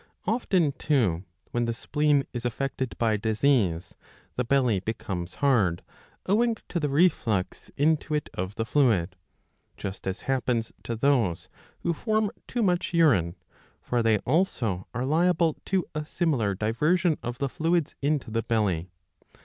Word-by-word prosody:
Often 190 Hz, -, +2 dB
too, 100 Hz, -, +1 dB, 0.3 s
when 120 Hz, 0 st, 0 dB
the 115 Hz, -, -1 dB
spleen 150 Hz, +2 st, +1 dB
is 120 Hz, -1 st, -4 dB
affected 130 Hz, +1 st, -3 dB
by 110 Hz, -2 st, +2 dB
disease, 110 Hz, -5 st, +1 dB, 0.4 s
the 125 Hz, -, 0 dB
belly 125 Hz, -5 st, +2 dB
becomes 95 Hz, -4 st, -4 dB
hard 110 Hz, -, +2 dB
^^ -, -, -32 dB, 0.3 s
owing 225 Hz, +4 st, +2 dB
to 175 Hz, -, -1 dB
the 150 Hz, -2 st, -1 dB
reflux 135 Hz, -, +1 dB
into 155 Hz, +1 st, +2 dB
it 150 Hz, -, -1 dB
of 95 Hz, +3 st, -4 dB
the 115 Hz, -, -2 dB
fluid; 110 Hz, -, +2 dB, 0.6 s
just 95 Hz, 0 st, -6 dB
as 95 Hz, +1 st, -3 dB
happens 125 Hz, -3 st, -1 dB
to 115 Hz, -, -2 dB
those 115 Hz, -8 st, +1 dB, 0.3 s
who 170 Hz, -, 0 dB
form 215 Hz, +2 st, 0 dB, 0.2 s
too 240 Hz, -2 st, -1 dB
much 180 Hz, -2 st, 0 dB
urine, 95 Hz, -, +3 dB, 0.5 s
for 120 Hz, -1 st, 0 dB
they 115 Hz, -1 st, +3 dB
also 120 Hz, -, 0 dB
are 125 Hz, +2 st, -2 dB
liable 165 Hz, +2 st, +2 dB
to 190 Hz, -3 st, 0 dB
a 155 Hz, 0 st, -2 dB
similar 140 Hz, -, 0 dB
diversion 150 Hz, -, +1 dB
of 120 Hz, 0 st, -4 dB
the 140 Hz, -, -1 dB
fluids 165 Hz, +3 st, 0 dB
into 145 Hz, -4 st, 0 dB
the 115 Hz, +1 st, 0 dB
belly. 100 Hz, -7 st, 0 dB
130 Hz, 150 wpm, -27 LUFS, 110-155 Hz, 0.6 s, urine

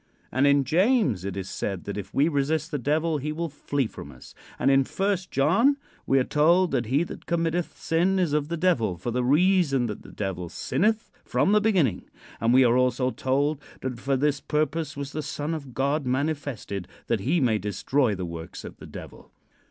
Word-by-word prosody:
And 130 Hz, +3 st, +3 dB
in 140 Hz, 0 st, +4 dB
James 165 Hz, -, +2 dB
it 100 Hz, 0 st, -4 dB
is 95 Hz, -1 st, -4 dB
said 95 Hz, -3 st, -4 dB
that 100 Hz, -, -5 dB
if 100 Hz, -1 st, -6 dB
we 145 Hz, +3 st, +3 dB
resist 155 Hz, +1 st, 0 dB
the 145 Hz, -, -1 dB
Devil 155 Hz, +4 st, 0 dB
he 150 Hz, +3 st, -3 dB
will 165 Hz, +2 st, -3 dB
flee 145 Hz, -1 st, -2 dB
from 70 Hz, -9 st, -9 dB
us; 65 Hz, -2 st, -14 dB, 0.2 s
and 135 Hz, -, +3 dB
in 135 Hz, 0 st, +5 dB
First 195 Hz, +4 st, -1 dB
John 210 Hz, -, +3 dB, 0.3 s
we 135 Hz, -, +4 dB
are 130 Hz, -, +4 dB
told 170 Hz, +6 st, +3 dB
that 120 Hz, -4 st, 0 dB
he 140 Hz, +7 st, +2 dB
that -, -, -9 dB
committeth 170 Hz, 0 st, -1 dB
sin 175 Hz, +4 st, +1 dB
is 175 Hz, -6 st, +1 dB
of 150 Hz, -1 st, +1 dB
the 170 Hz, +1 st, -3 dB
Devil, 125 Hz, -, +1 dB
for 105 Hz, +7 st, -4 dB
the 125 Hz, +1 st, 0 dB
reason 150 Hz, -1 st, +3 dB
that 105 Hz, -3 st, -5 dB
the -, -, -13 dB
Devil 90 Hz, -4 st, -4 dB
sinneth 215 Hz, -, 0 dB
from 195 Hz, -, +1 dB
the 210 Hz, 0 st, +5 dB
beginning; 175 Hz, -, +1 dB, 0.3 s
and 115 Hz, +1 st, +2 dB
we 130 Hz, +1 st, +6 dB
are 120 Hz, +1 st, +4 dB
also 125 Hz, 0 st, +2 dB
told 140 Hz, +3 st, 0 dB, 0.2 s
that 130 Hz, -2 st, -4 dB
"for 135 Hz, +1 st, 0 dB
this 145 Hz, +1 st, +1 dB
purpose 155 Hz, 0 st, -1 dB
was 140 Hz, 0 st, -5 dB
the 155 Hz, -, -3 dB
Son 145 Hz, +2 st, -3 dB
of 140 Hz, -6 st, -7 dB
God 140 Hz, +1 st, 0 dB
manifested, 130 Hz, -, -2 dB, 0.2 s
that 115 Hz, -, 0 dB
he 145 Hz, -, +1 dB
may 115 Hz, -6 st, +2 dB
destroy 105 Hz, +4 st, 0 dB
the 90 Hz, -1 st, -4 dB
works 85 Hz, -1 st, -7 dB
of -, -, -9 dB
the -, -, -11 dB
Devil." -, -, -11 dB
140 Hz, 205 wpm, -26 LUFS, 120-165 Hz, 0.3 s, we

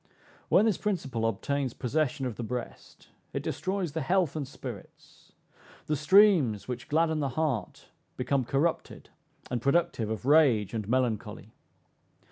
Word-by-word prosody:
When 215 Hz, -, +5 dB
this 220 Hz, -5 st, +1 dB
principle 135 Hz, -, -1 dB
obtains 130 Hz, +4 st, -2 dB
possession 140 Hz, +1 st, -1 dB
of 120 Hz, -4 st, -3 dB
the -, -, -6 dB
breast, 120 Hz, +1 st, -7 dB, 0.2 s
it -, -, -3 dB
destroys 190 Hz, -3 st, -2 dB
the 160 Hz, +2 st, -3 dB
health 175 Hz, +1 st, +1 dB
and 145 Hz, -4 st, -3 dB
spirits: 130 Hz, -6 st, -11 dB, 0.5 s
the 150 Hz, -, 0 dB
streams 155 Hz, -, +4 dB
which 125 Hz, -1 st, -5 dB
gladden 160 Hz, +1 st, +2 dB
the 140 Hz, -2 st, -1 dB
heart 130 Hz, -, -3 dB, 0.3 s
become 130 Hz, +1 st, 0 dB
corrupted, 160 Hz, +7 st, -2 dB, 0.4 s
and 120 Hz, -2 st, -1 dB
productive 140 Hz, -6 st, +1 dB
of 110 Hz, +2 st, -4 dB
rage 135 Hz, -9 st, +4 dB
and 110 Hz, -2 st, -4 dB
melancholy. 125 Hz, -4 st, -1 dB
135 Hz, 135 wpm, -28 LUFS, 120-160 Hz, 0.5 s, When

